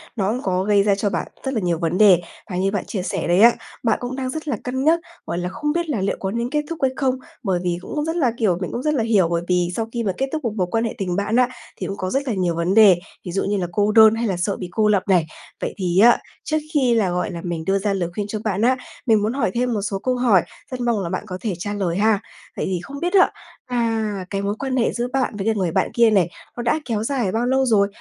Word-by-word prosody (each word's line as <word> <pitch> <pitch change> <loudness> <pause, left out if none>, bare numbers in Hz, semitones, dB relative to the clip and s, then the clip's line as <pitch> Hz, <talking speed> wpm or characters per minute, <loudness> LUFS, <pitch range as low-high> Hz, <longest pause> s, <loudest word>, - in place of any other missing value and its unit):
nó 205 -2 0
có 185 -1 0
gây 200 0 +3
ra 200 -1 +3
cho 205 +1 0
bạn - - -2 0.2
rất 265 - -1
là 230 - 0
nhiều 175 -4 0
vấn 170 +1 0
đề. 190 -5 +6 0.3
Và 180 - -4
như 195 +1 +1
bạn 205 - -2
chia 195 - -3
sẻ - - -2
đấy 175 +2 +3
á, 235 +1 +7 0.3
bạn 230 - +2
cũng 245 +1 -4
đang 260 -1 -3
rất 315 +4 -5
là 265 -7 -1
cân 260 +1 -2
nhắc, 325 +3 +4 0.3
gọi 170 - -3
là, 180 0 -2
không 295 +9 -2
biết 340 -1 -1
là 235 -10 -1
liệu 195 - -1
có 190 - -2
nên 235 +2 -2
kết 300 +2 0
thúc 330 - -5
hay 265 -1 +3
không 265 -2 +1 0.3
bởi 190 -5 0
vì 175 -1 0
cũng 300 +8 -3
rất 325 +1 -2
là 275 -9 +2
kiểu, 200 -8 +2
mình 180 - -3
cũng 245 - -4
rất 300 - +1
là 250 -6 +1
hiểu, 210 -6 +3
bởi 170 0 0
vì 180 -1 +1
sau 225 - -2
khi 235 -1 -1
mà 200 - +1
kết 270 - +1
thúc 310 -1 -2
một 230 -4 -1
mối 185 -4 0
quan 225 0 +1
hệ 230 - -3
tình 180 -3 -2
bạn 205 +3 0
á 250 0 +4 0.3
thì - - -4
cũng 200 - -5
có 185 - -3
rất 270 +6 -1
là 245 - 0
nhiều 180 -4 0
vấn 170 +3 0
đề, 200 -5 +7 0.3
ví 175 - -4
dụ 195 - 0
như 205 +1 0
là 180 -2 -1
cô 205 +3 +2
đơn 220 0 +7
hay 230 +1 -1
là 190 -3 -1
sợ 190 +3 -1
bị 180 - -6
cô 215 +3 +2
lập 205 -3 +3
này. 180 -4 +3 0.4
Vậy - - -2
thì 180 -2 +1
á, 235 +3 +7 0.3
trước 310 - 0 0.2
khi 260 -5 +3
là, 200 -5 +2
gọi 180 +3 -1
là, 170 - -6
mình 170 -2 -4
đưa 195 +2 +2
ra 200 0 0
lời 175 -3 -1
khuyên 205 +2 -3
cho 215 +1 -4
bạn 205 -2 -1
á, 255 +3 +3 0.3
mình 220 -4 +4
muốn 215 +3 0
hỏi 275 -8 0
thêm 245 0 0
một 210 - -1
số 195 -1 -2
câu 255 +5 0
hỏi, 235 -7 +4 0.3
rất 255 - -4
mong 235 -3 +1
là 170 - -3
bạn 185 - -3
có 185 -2 -5
thể 215 -4 -1
trả 205 +3 -3
lời 185 -4 -1
ha. 215 0 +3 0.4
Vậy - - -1
thì 185 -2 -1
không 280 +8 -8
biết 350 +4 -2
á, 380 -2 +5 0.3
à, 225 -5 -1
cái 195 -1 -2
mối 200 +1 -1
quan 265 -2 -2
hệ 235 - +2
giữa 240 0 -2
bạn 265 -5 0
với 195 - -3
lại 225 - +2
người 185 -5 0
bạn - - 0
kia 235 -1 +5
này, 190 -5 +3 0.3
nó 240 - -3
đã 240 +6 +1
kéo 220 -3 -1
dài 240 -6 -1
bao 230 +4 0
lâu 265 +1 +2
rồi? 210 -5 +3
210 Hz, 300 wpm, -21 LUFS, 190-245 Hz, 0.4 s, á